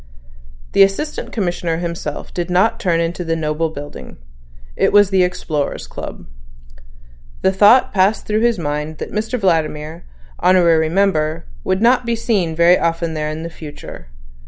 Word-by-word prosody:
The -, -, +3 dB
Assistant 195 Hz, +11 st, +1 dB
Commissioner 175 Hz, -5 st, -2 dB
himself 170 Hz, -3 st, -5 dB
did 175 Hz, 0 st, -3 dB
not 185 Hz, +5 st, +2 dB
turn 170 Hz, -4 st, +1 dB
into 170 Hz, +2 st, -2 dB
the 165 Hz, -1 st, -1 dB
noble 160 Hz, 0 st, -1 dB
building. 145 Hz, -, -9 dB, 0.6 s
It -, -, +2 dB
was 205 Hz, -1 st, +5 dB
the 190 Hz, -1 st, +3 dB
Explorers' 155 Hz, -, -2 dB
Club. -, -, -8 dB, 1.2 s
The 190 Hz, -, +4 dB
thought 210 Hz, +6 st, +5 dB
passed 195 Hz, +2 st, +2 dB
through 215 Hz, 0 st, 0 dB
his 235 Hz, -1 st, +2 dB
mind 150 Hz, -1 st, -3 dB
that -, -, -6 dB
Mr 220 Hz, +4 st, -2 dB
Vladimir, 160 Hz, -5 st, -1 dB, 0.3 s
honorary 170 Hz, -3 st, +4 dB
member, 165 Hz, -4 st, 0 dB, 0.2 s
would 190 Hz, +3 st, 0 dB
not 250 Hz, +1 st, +4 dB
be 235 Hz, 0 st, -1 dB
seen 200 Hz, -8 st, -1 dB
very 170 Hz, +2 st, +5 dB
often 165 Hz, 0 st, -1 dB
there 150 Hz, -1 st, -2 dB
in 155 Hz, +1 st, -5 dB
the 170 Hz, -, -5 dB
future. 150 Hz, -, -10 dB
170 Hz, 155 wpm, -18 LUFS, 160-195 Hz, 1.2 s, was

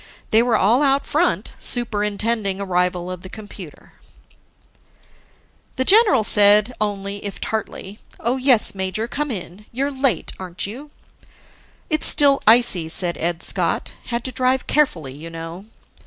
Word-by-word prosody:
They 220 Hz, -, +5 dB
were 235 Hz, -2 st, +2 dB
all 225 Hz, +8 st, +3 dB
out 275 Hz, -1 st, +2 dB
front 340 Hz, +4 st, 0 dB
superintending 210 Hz, -3 st, -1 dB
arrival 180 Hz, -2 st, -1 dB
of 180 Hz, -1 st, -7 dB
the 185 Hz, -, -10 dB
computer. 200 Hz, -7 st, -12 dB, 1.8 s
The 260 Hz, -, -1 dB
general 400 Hz, -, +5 dB
said 210 Hz, +3 st, +5 dB
only, 200 Hz, -1 st, -3 dB
if 200 Hz, -3 st, -6 dB
tartly, 210 Hz, -2 st, -5 dB, 0.2 s
"Oh 240 Hz, +3 st, -1 dB
yes, 255 Hz, -4 st, +3 dB
major, 190 Hz, +3 st, -3 dB
come 295 Hz, +4 st, -3 dB
in. 200 Hz, -2 st, -7 dB
You're 275 Hz, +4 st, -2 dB
late, 265 Hz, -, 0 dB
a'n't 180 Hz, -2 st, -5 dB
you?" 255 Hz, +9 st, -8 dB, 1.0 s
"It's 310 Hz, -2 st, +1 dB
still 280 Hz, -1 st, +5 dB
icy," 220 Hz, -8 st, +4 dB
said 175 Hz, 0 st, -1 dB
Ed 170 Hz, 0 st, -2 dB
Scott. -, -, -2 dB
"Had 235 Hz, -1 st, -4 dB
to 260 Hz, -, -5 dB
drive 255 Hz, +2 st, 0 dB
carefully, 165 Hz, -, 0 dB
you 155 Hz, +4 st, -9 dB
know." 165 Hz, +4 st, -9 dB
210 Hz, 140 wpm, -20 LUFS, 185-255 Hz, 1.8 s, They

